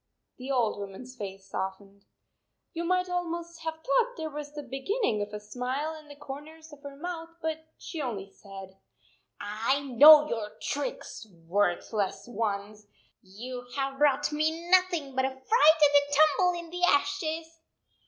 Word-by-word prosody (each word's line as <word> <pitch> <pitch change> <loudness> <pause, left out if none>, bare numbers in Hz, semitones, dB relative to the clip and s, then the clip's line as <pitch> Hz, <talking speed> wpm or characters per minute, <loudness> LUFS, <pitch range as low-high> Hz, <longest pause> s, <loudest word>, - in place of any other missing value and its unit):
The 255 +2 -7
old 240 -6 +1
woman 200 +3 -7
s 255 +1 -12
face 195 -3 -8
softened. 195 +1 -6 0.7
You 335 - -3
might 365 +1 +1
almost 340 -1 -4
have 320 0 -3
thought 470 - +1
there 315 -1 -4
was 295 0 -6
the 295 - -5
beginning 270 - -1
of 205 0 -4
a 210 - -5
smile 255 +8 -3
in 310 -1 -12
the 290 - -11
corners 295 +3 -10
of 290 - -14
her 280 -1 -9
mouth, 330 +2 -6
but 320 -1 -4
she 320 - -6
only 215 -8 -4
said, 195 -1 -12 0.4
" - - -46
I 220 +7 -1
know 295 +3 +8
your 215 -5 -4
tricks, 290 - -4 0.2
worthless 200 +3 0
ones! 210 -2 -3 0.3
You 245 +6 -8
have 270 0 -2
brought 290 0 +3
me 320 +3 -1
nothing 355 -7 +3
but 260 0 +1
a - - +1
fright 265 0 -13
and - - -29 0.7
a 285 - -1
tumble 310 +4 +4
in 340 -1 -10
the 355 0 -5
ashes." 325 -1 +1
280 Hz, 165 wpm, -28 LUFS, 215-320 Hz, 0.7 s, know